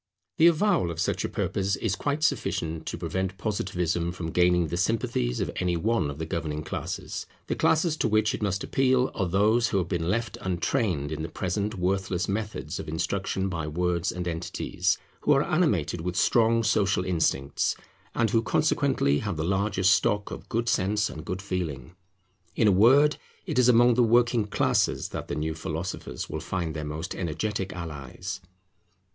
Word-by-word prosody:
The 165 - +7
avowal 170 - +3
of 85 -1 -5
such - - 0
a - - -2
purpose 100 0 -1
is 105 -2 -1
quite 145 +7 -2
sufficient 80 - -1
to - - -3
prevent 95 +3 -3
Positivism 90 -5 -1
from 85 -2 -5
gaining 90 0 +3
the 85 - -2
sympathies 90 - 0
of - - -1
any 90 -1 0
one 105 -3 +1
of 70 - -6
the 80 - -3
governing 75 -2 -3
classes. - - -5 0.2
The - - -1
classes 160 0 +2
to - - +1
which 110 0 +2
it - - -4
must 100 -2 -1
appeal 130 -1 +2
are 95 - -1
those 105 +6 +3
who 100 - 0
have 90 -2 0
been 85 -2 -1
left 115 -1 -1
untrained 90 - -1
in 80 0 -3
the 80 - -4
present 100 +5 -2
worthless 95 0 0
methods 105 +2 -3
of - - -6
instruction 95 +4 -1
by 85 -4 -3
words 85 +2 0
and 90 0 -4
entities, 85 0 -1 0.2
who 150 - +3
are 135 +1 +3
animated 90 - +1
with 90 +1 -3
strong 115 +4 +3
social 100 -4 +2
instincts, 80 -6 0 0.4
and 115 -3 +2
who 115 - +3
consequently 130 - +2
have 100 -2 -3
the 80 - -1
largest 95 +1 +2
stock 105 0 +1
of - - -8
good 115 +1 -1
sense 105 0 +1
and 75 - -8
good 95 +2 -4
feeling. 85 -7 -4 0.6
In 110 - +3
a - - +6
word 130 +10 +5 0.3
it - - 0
is 125 0 +5
among 120 0 +6
the 125 - +3
Working 120 -1 +3
Classes - - +1
that - - -6
the - - -3
new 80 +1 -2
philosophers 80 -4 -5
will - - -4
find 85 -4 -3
their 75 - -3
most 75 +2 -4
energetic 95 +3 -3
allies. 85 +3 -6
95 Hz, 180 wpm, -27 LUFS, 85-110 Hz, 0.6 s, The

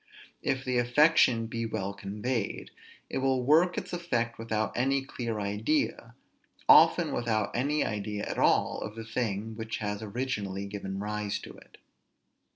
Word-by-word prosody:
If 135 0 -1
the 125 -1 +1
affection 120 -2 +4
be 115 0 -3
well 100 -3 -3
conveyed, 105 +3 -3 0.4
it - - -3
will 130 -1 +1
work 165 +7 +4
its - - -5
effect 120 -11 -1
without 110 -1 -2
any 135 +2 +1
clear 115 -5 -4
idea, 110 +3 -1 0.5
often - - +7
without 110 -4 -1
any 145 +5 +1
idea 105 0 -3
at - - -4
all - - +2
of 105 - -6
the 115 -1 -7
thing 110 -2 -2
which 110 0 -4
has 105 -1 -3
originally 105 -4 -3
given 100 -1 -5
rise 105 0 -2
to - - -9
it. - - -17
115 Hz, 150 wpm, -29 LUFS, 105-125 Hz, 0.5 s, often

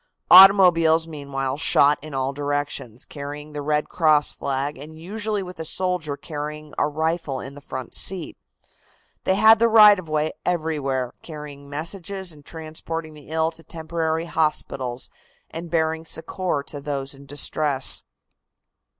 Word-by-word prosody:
Automobiles 175 -4 +8
meanwhile 140 -3 -4
shot 145 -1 +4
in 155 -1 -8
all 135 +1 -1
directions, 145 -5 -3
carrying 145 +1 -8
the 145 - -4
Red 150 +1 0
Cross 155 -3 +3
flag 140 +2 -2
and 155 +4 -11
usually 210 +3 -3
with 180 -2 -10
a - - -3
soldier 170 -4 -2
carrying 150 0 -7
a - - +2
rifle 155 -2 -2
in 135 - -7
the 145 - -12
front 130 -3 -7
seat. 180 -4 0 0.9
They 190 - +3
had 220 +2 +6
the 230 - +4
right 210 -3 +8
of 165 -4 -10
way 155 0 0
everywhere, 145 -7 -1
carrying 150 -3 -10
messages 175 +5 -3
and 150 -2 -14
transporting 160 0 -6
the 150 -1 -14
ill 160 0 +1
to 165 - -13
temporary 160 0 -3
hospitals 140 -6 -1 0.4
and 170 +1 -7
bearing 160 0 0
succor 165 -2 -2
to 145 - -8
those 140 -1 -3
in 140 0 -14
distress. 145 -1 +2
155 Hz, 145 wpm, -23 LUFS, 145-165 Hz, 0.9 s, Automobiles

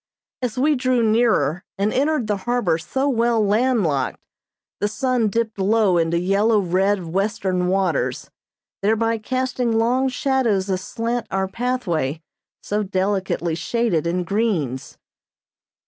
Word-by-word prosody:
As 250 -2 -3
we 295 +4 +3
drew 255 -3 +1
nearer 215 - +2
and 200 +2 0
entered 285 -2 +1
the 210 -1 -1
harbor 200 -10 +1
so 265 - -2
well 235 -3 +2
land 230 +2 +2
locked, 140 -5 -1 0.6
the 205 - +1
sun 245 +1 0
dipped 220 0 -2
low 195 -2 +3
into 165 +1 +1
yellow 200 +5 +2
red 190 +1 +1
western 185 0 -1
waters, 185 -4 -1 0.5
thereby 225 +2 +1
casting 250 -1 -1
long 250 +4 +2
shadows 245 -8 0
aslant 230 +5 -2
our 190 0 -1
pathway 190 - -2 0.4
so 210 +1 -1
delicately 190 -3 -1
shaded 175 -2 0
in 180 +1 0
greens. 175 - -2
210 Hz, 125 wpm, -21 LUFS, 185-240 Hz, 0.6 s, we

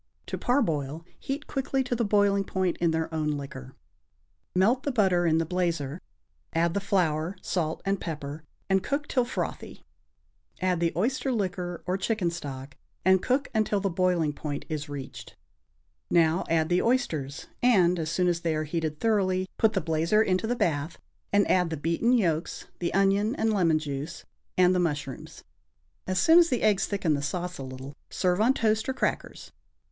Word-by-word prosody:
(To - - -4
parboil, 165 - 0
heat 280 +3 -4
quickly 270 -1 -1
to 250 -1 -2
the 235 - 0
boiling 205 -1 +3
point 185 -2 -1
in 170 - +2
their 160 0 -1
own 155 -1 -1
liquor.) 130 -2 -8 0.8
Melt 220 +8 +3
the 285 - -1
butter 190 -7 +2
in 160 -1 +3
the 165 - +1
blazer, 165 -3 -2 0.5
add 165 +1 +2
the 200 - 0
flour, 175 -3 0
salt 160 -3 -2
and 195 0 0
pepper, 150 -2 -5 0.2
and 190 0 +3
cook 285 +8 -2
till 250 -2 +1
frothy; - - -5 0.8
add 185 -2 +1
the 170 -1 +1
oyster 260 - 0
liquor 180 -5 -3
or 185 +2 -1
chicken 195 -4 0
stock 140 -5 -7 0.3
and 190 0 +5
cook 270 +3 0
until 215 -2 +1
the 195 -1 -1
boiling 175 -4 +1
point 145 -1 -5
is 150 -1 -4
reached. 140 -2 -8 0.7
Now 165 +1 +3
add 160 -1 +2
the 180 +1 +3
oysters, 160 - -1 0.2
and, 180 -8 +4
as 160 -1 -2
soon 180 +2 +1
as 175 -1 +1
they 165 -2 0
are 155 - -1
heated 155 -1 -3
thoroughly, 190 -4 +1
put 220 -1 +4
the 190 - 0
blazer 165 +6 +2
into 185 +2 0
the 245 - 0
bath 155 -6 -1 0.3
and 205 0 +3
add 180 -2 +3
the 160 - -3
beaten 170 +10 +1
yolks, 170 -10 0
the 170 - -1
onion 200 +4 +2
and 220 -4 +1
lemon 170 -6 +3
juice 150 +1 -5 0.3
and 180 0 +5
the 180 - +2
mushrooms. 145 -6 -3 0.6
As 185 0 -1
soon 325 - +7
as 340 -1 +5
the 250 -4 0
eggs 210 -3 +3
thicken 190 -6 0
the 140 - -1
sauce 180 +4 -3
a - - -4
little, 130 +1 -8 0.2
serve 180 +1 +1
on 250 +4 +4
toast 220 +1 +1
or - - 0
crackers. 265 - -3
180 Hz, 180 wpm, -27 LUFS, 160-205 Hz, 0.8 s, soon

